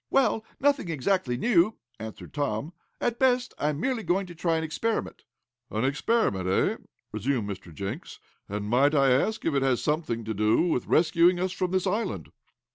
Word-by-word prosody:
"Well, 260 -5 +2 0.2
nothing 280 -10 +2
exactly 155 -4 0
new," 215 - +3 0.2
answered 110 0 -8
Tom. 145 +1 -2 0.3
"At 240 -1 -1
best 250 -1 +2
I 150 - +1
am 150 -1 -3
merely 255 +3 0
going 195 -1 0
to 175 - -10
try 165 0 0
an 160 - -2
experiment." 190 +9 -2 0.4
"An 110 +4 -1
experiment, 135 - +1
eh?" 95 - +2 0.3
resumed 110 0 -1
Mr. 95 -3 -7
Jenks, 100 - -6 0.3
"And 105 +1 -3
might 135 +7 +3
I 135 -2 +4
ask 215 +13 +1
if 165 - +1
it 140 - +2
has 135 0 +1
anything 150 -7 -1
to 110 - -2
do 105 +5 +3
with 165 -8 0
rescuing 175 +2 +4
us 185 0 0
from 185 -1 -1
this 185 +1 0
island?" 210 +4 -2
155 Hz, 180 wpm, -27 LUFS, 120-190 Hz, 0.4 s, I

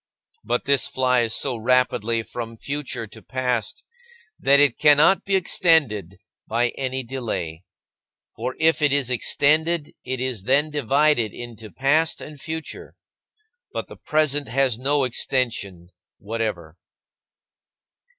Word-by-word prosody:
But 120 +3 -1
this 140 -1 +3
flies 125 -3 +1
so 130 -4 -1
rapidly 115 -1 +1
from 115 0 -7
future 140 -3 -4
to 105 - -14
past 125 -4 -3 0.6
that 140 +1 +5
it 145 -4 +3
cannot 150 +5 +5
be 195 - +1
extended 145 - +2 0.3
by 120 +2 +1
any 130 0 -3
delay. 110 -10 -5 0.7
For 125 +3 -4
if 160 0 +3
it 145 -2 +3
is 140 -3 +1
extended, 155 +5 +2
it 130 0 -3
is 125 -6 -3
then 145 +5 +2
divided 140 -4 +2
into 115 -3 -9
past 145 +6 +1
and 150 -2 -10
future. 160 - -7 0.8
But - - -5
the - - -10
present 150 -2 0
has 125 -1 +1
no 140 +2 +1
extension 115 -8 -2 0.3
whatever. 100 -7 -4
130 Hz, 120 wpm, -23 LUFS, 115-145 Hz, 0.8 s, that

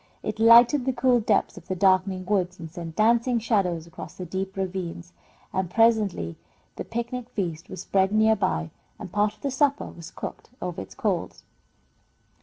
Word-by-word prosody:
It - - -4
lighted 240 +4 +7
the 265 - +1
cool 245 0 +3
depths 210 -4 +1
of 175 - -12
the 185 - -2
darkening 185 0 +2
woods, 185 -2 0
and 165 -1 -8
sent 170 -2 -7
dancing 235 +3 +3
shadows 195 -8 0
across 170 -1 -10
the 185 - -6
deep 190 +2 -4
ravines, 180 -2 -4 0.4
and 190 -2 -1
presently 210 - +2 0.4
the - - -5
picnic 235 +1 -4
feast 170 -8 -4
was 185 - -7
spread 190 0 +1
near 220 +1 +4
by 135 - -1 0.3
and 180 - -9
part 210 +1 +1
of - - -31
the 280 - -2
supper 280 +2 +1
was 170 0 -10
cooked - - -8
over 180 - -4
its 95 - -11
coals. - - -2
195 Hz, 175 wpm, -25 LUFS, 180-230 Hz, 0.4 s, lighted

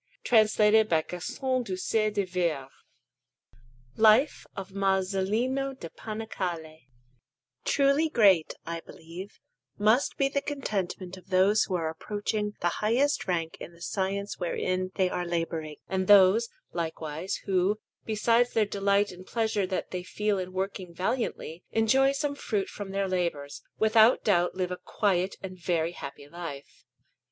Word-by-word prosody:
Castiglione 215 -1 +5
d'Olona: 160 -6 +2
Baptistery) 215 - -1
Alinari] 170 -7 -1 1.3
LIFE 220 +6 +4
OF 195 0 -6
MASOLINO 200 +8 0
DA 170 -10 -8
PANICALE 215 -5 -4
PAINTER 160 -2 -14 0.8
Truly 280 +3 +3
great, 195 - +4
I 170 0 -4
believe, 170 +4 -10 0.4
must 215 +6 +2
be 275 - +3
the 280 +1 -1
contentment 195 -10 -3
of 185 0 -16
those 190 +3 +4
who 185 - -2
are 165 -2 -1
approaching 210 +5 -3
the 175 - +2
highest 260 +7 +2
rank 165 -3 -1
in 170 - -9
the 170 - -19
science 200 +1 -2
wherein 185 +1 -1
they 190 -2 +2
are 180 0 -2
labouring; 165 -3 -3
and 190 -1 -1
those, 205 +3 +6 0.2
likewise, 160 +1 -3
who, 195 +1 +2 0.3
besides 230 +3 +2
the 220 -2 +3
delight 200 0 +1
and 185 +1 -12
pleasure 220 -4 0
that 185 - -3
they 180 - -3
feel 210 +2 -1
in 185 0 -5
working 185 -2 -4
valiantly, 180 -3 -2
enjoy 265 +5 +3
some 285 +1 -1
fruit 210 -8 -2
from 205 -2 -7
their 195 0 -1
labours, 150 -7 -2 0.2
without 220 +2 +5
doubt 175 -4 +2
live 185 -1 -2
a 180 - -3
quiet 190 -2 0
and 185 -1 -7
very 170 -1 0
happy 140 -3 -9
life. 145 -3 -9
195 Hz, 140 wpm, -28 LUFS, 175-220 Hz, 1.3 s, those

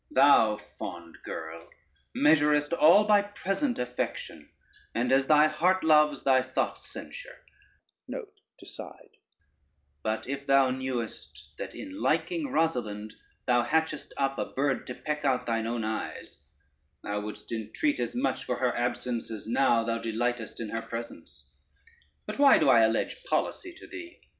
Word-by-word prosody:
Thou, - - +5 0.2
fond 85 -1 -7
girl, 80 +1 -7 0.5
measurest 150 0 +3
all 170 +5 +6
by 210 -1 +5
present 205 +6 -2
affection, 125 0 -4 0.5
and 125 +2 0
as 135 0 +3
thy 150 0 +6
heart 180 +5 +1
loves, 150 -2 +4
thy 130 -1 +4
thoughts 130 0 -3
censure; - - -10 0.6
but 465 -5 -6 2.0
if 140 +1 -5
thou 135 -1 +5
knowest 115 - -5
that - - -6
in 285 +1 -8
liking 330 -5 0
Rosalynde 110 - -1 0.3
thou 120 -1 +3
hatchest 155 +4 -1
up 135 -1 0
a - - 0
bird 135 -1 -1
to 125 - -5
peck 150 -1 -4
out 130 -3 +1
thine 115 -1 -1
own 115 -1 -2
eyes, 110 -9 -5 0.6
thou 105 0 -2
wouldst 105 0 -8
entreat 115 - -1
as - - -2
much 250 - -1
for 125 - -2
her 125 -1 0
absence 120 -1 -2
as 110 -2 -7
now 115 -1 +3
thou 115 0 -1
delightest 115 0 -2
in 115 -2 -4
her 115 - -3
presence. 115 +1 -8 0.8
But - - -6
why 280 -1 +7
do 150 - +3
I 120 -3 +7
allege 115 - +1
policy 370 -6 -1
to - - -12
thee? 350 -2 -10
130 Hz, 145 wpm, -28 LUFS, 115-160 Hz, 2.0 s, why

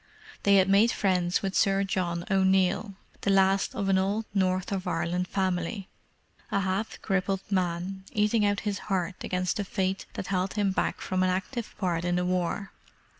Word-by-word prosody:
They 200 0 +4
had 190 -1 +5
made 200 +4 +5
friends 180 -3 +1
with 195 -1 -1
Sir 195 0 +3
John 175 -3 -2
O'Neill, 190 +1 +2 0.3
the - - 0
last 195 0 +3
of 200 - -1
an 190 -1 +3
old 205 +4 0
North 185 -1 +1
of 190 -2 -2
Ireland 175 +2 -1
family: 185 +1 -2 0.6
a 200 - +1
half 190 +3 -2
crippled 195 -1 0
man, 185 +1 -1
eating 210 0 +2
out 205 0 +1
his 205 -1 -2
heart 185 -1 -1
against 180 0 -1
the 205 - -1
fate 190 0 -2
that - - -5
held 185 0 -1
him 205 -2 +1
back - - -1
from 185 0 -1
an 185 - +3
active 195 +6 -3
part 175 -4 -1
in 175 0 0
the 180 0 0
war. 185 +2 -1
190 Hz, 175 wpm, -28 LUFS, 185-200 Hz, 0.6 s, had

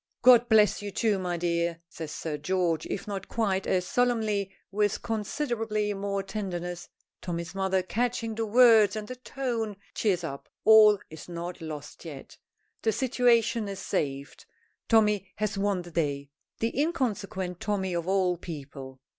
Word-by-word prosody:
"God 245 -1 +7
bless 215 -2 +5
you 205 - -4
too, 210 0 +1
my 180 -2 -2
dear," 170 0 0
says 160 -2 -7
Sir 155 0 -4
George, 165 +1 0
if 195 - -4
not 195 -2 -5
quite 195 -4 0
as 180 -1 +1
solemnly, 220 -4 +1 0.2
with 205 0 0
considerably 220 -2 -1
more 200 0 -2
tenderness. 180 -4 -5 0.3
Tommy's 170 -1 -4
mother, 190 -1 0
catching 230 +2 -1
the 225 0 -2
words 220 -3 +6
and 215 -1 -5
the 255 - -6
tone, 240 -5 -3 0.2
cheers 185 -5 0
up. 140 -4 -6 0.2
All 215 -1 +8
is 160 +2 -10
not 175 +1 -6
lost 150 -2 -8
yet! 150 -5 -9 0.5
The 220 - +2
situation 235 -2 +2
is 195 -1 -5
saved. 140 -8 -3 0.4
Tommy 210 -4 +3
has 215 0 -2
won 195 -2 0
the 175 - -11
day. 145 -4 -2 0.3
The 230 +4 0
inconsequent 205 - -2
Tommy 195 -3 -1
of 170 0 -2
all 185 -2 +2
people! 135 -5 -9
195 Hz, 150 wpm, -28 LUFS, 175-220 Hz, 0.5 s, All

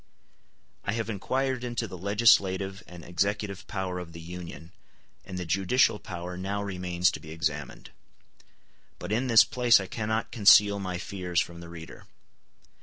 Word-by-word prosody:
I 100 - -1
have 115 0 -2
inquired 130 +5 -1
into 120 -2 -3
the 95 - -8
legislative 95 -1 +2
and 85 -2 -11
executive 100 +2 -2
power 95 -2 -3
of 85 -2 -9
the 85 - -9
Union, 85 0 -9 0.5
and 95 - -7
the 90 - -4
judicial 100 - +2
power 90 +1 -7
now 100 +3 -3
remains 90 -2 0
to - - -6
be 80 - -12
examined; 75 -2 -4 1.1
but 90 - -7
in 120 +5 0
this 115 -3 +8
place 125 -5 +4
I 95 - -4
cannot 110 +2 -2
conceal 100 -2 +6
my 90 -2 -3
fears 90 -2 -2
from 85 -1 -3
the 85 -1 -10
reader. 85 -1 -11
95 Hz, 155 wpm, -28 LUFS, 90-105 Hz, 1.1 s, this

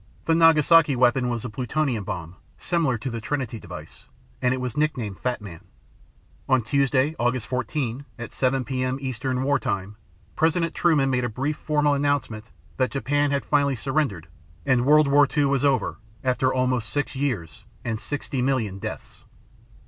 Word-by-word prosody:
The 165 - +3
Nagasaki 165 -2 +5
weapon 125 0 +3
was 120 -1 -3
a - - -3
plutonium 125 -1 -1
bomb, 85 -1 -5 0.2
similar 165 -8 0
to 125 +3 -5
the 115 -1 -4
Trinity 120 -2 -3
device, - - -11 0.3
and 125 - +2
it 130 - -1
was 125 -3 -4
nicknamed 130 -10 -1
Fat 125 -3 -2
Man. 85 -5 -10 0.9
On 130 -2 +3
Tuesday 140 +4 +1
August 120 0 0
14, 130 0 -2
at 120 -2 -7
7 130 0 +1
p.m. 130 0 -1
Eastern 130 -1 -2
War 145 +1 +2
Time, 100 +1 -3 0.4
President 165 +1 +1
Truman 150 -6 +2
made 125 -1 +1
a 120 - -1
brief 135 +7 -2
formal 150 -1 +1
announcement 140 -6 -1 0.3
that 130 -1 +2
Japan 145 +2 0
had 140 0 -1
finally 140 -2 +2
surrendered 130 - -1 0.4
and 125 0 +2
World 150 0 +6
War 145 +1 +5
II 145 - +4
was 140 -1 +1
over 140 -5 +1 0.2
after 130 0 +1
almost 125 -3 0
six 145 -1 -2
years 120 - -3 0.2
and 115 -2 -2
60 140 -1 -3
million 120 -7 0
deaths! - - -8
130 Hz, 165 wpm, -24 LUFS, 120-145 Hz, 0.9 s, World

